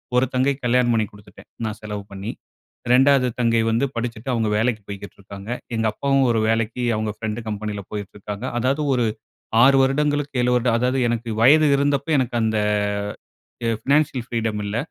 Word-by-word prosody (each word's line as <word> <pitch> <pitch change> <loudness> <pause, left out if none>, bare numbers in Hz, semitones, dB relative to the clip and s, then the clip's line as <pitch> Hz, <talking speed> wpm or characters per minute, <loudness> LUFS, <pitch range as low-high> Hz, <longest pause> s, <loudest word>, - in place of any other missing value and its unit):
1 125 +1 +4
தங்கைக்கு 135 +2 +1
கல்யாணம் 120 0 +3
பண்ணிக் 110 -3 0
குடுத்துட்டேன், 105 -1 -16 0.2
நான் 110 0 -4
செலவு 105 -1 -5
பண்ணி. 100 +3 -5 0.6
2வது 135 0 +5
தங்கை 115 -1 +3
வந்து 115 +4 +2
படிச்சிட்டு 115 +1 -4
அவங்க 115 -2 0
வேலைக்கு 110 0 0
போய்க்கிட்டு 100 0 -8
இருக்காங்க. 100 +1 -10 0.3
எங்க 110 0 0
அப்பாவும் 135 +4 +1
ஒரு 115 -1 +2
வேலைக்கு 115 +2 0
அவுங்க 110 0 -2
பிரெண்ட் 110 0 -3
கம்பெனியில 105 -1 -4
போய்கிட்டு 105 -2 -6
இருக்காங்க. 105 +3 -6
அதாவது 130 +5 +1
ஒரு 125 -2 +1 0.6
6 135 +2 +6
வருடங்களுக்கு 145 +1 0
7 125 - +2
வருடம் 120 -1 +2
அதாவது 125 +2 +1
எனக்கு 120 0 -2
வயது 150 +6 +6
இருந்தப்போ 140 +1 0
எனக்கு 125 -2 -1
அந்த 110 -1 +1 1.2
ஃபினான்சியல் 140 -3 +1
ஃப்ரீடம் 110 -3 -2
இல்ல. 100 +2 -2
115 Hz, 160 wpm, -22 LUFS, 110-130 Hz, 1.2 s, 6